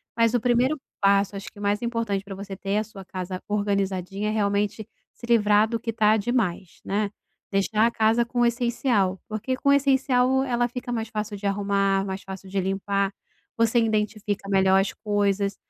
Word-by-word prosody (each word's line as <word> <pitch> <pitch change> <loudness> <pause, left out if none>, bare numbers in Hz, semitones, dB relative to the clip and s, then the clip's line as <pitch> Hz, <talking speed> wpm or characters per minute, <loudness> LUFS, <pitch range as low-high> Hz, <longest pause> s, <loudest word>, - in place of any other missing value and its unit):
mas 230 0 +3
o 245 - +3
1° 250 +5 +2 0.2
passo, 200 0 +3
acho 200 +3 -7
que 205 - -15
o - - -9
mais 205 +1 0
importante 230 -4 -1
pra 195 -1 -8
você 195 0 -7
ter 200 +1 -2
a 215 - +1
sua 200 -2 -11
casa 185 0 -6
organizadinha, 200 -1 -1
é - - 0
realmente 205 0 0 0.3
se - - -11
livrar 215 -2 +4
do 230 - -2
que 230 +1 -3
tá 215 -1 +3
demais, 200 -6 -2
né. 205 +1 0 0.4
Deixar 210 +3 +2
a 235 - +2
casa 225 +1 +3
com 240 +1 -3
o 240 - +5
essencial, 235 -5 +1
porque 225 +5 -3
com 280 - 0
o - - +7
essencial 265 -2 +3
ela 240 -1 0
fica 250 0 -7
mais 225 -1 -3
fácil 210 -1 -4
de 200 0 -8
arrumar, 195 -1 +1
mais 190 0 -5
fácil 190 0 -9
de 195 0 -1
limpar, 195 +1 -1 0.4
você 230 +1 +2
identifica 210 -2 -1
melhor 190 0 +4
as 195 - 0
coisas, 200 -2 0
210 Hz, 190 wpm, -25 LUFS, 195-230 Hz, 0.4 s, o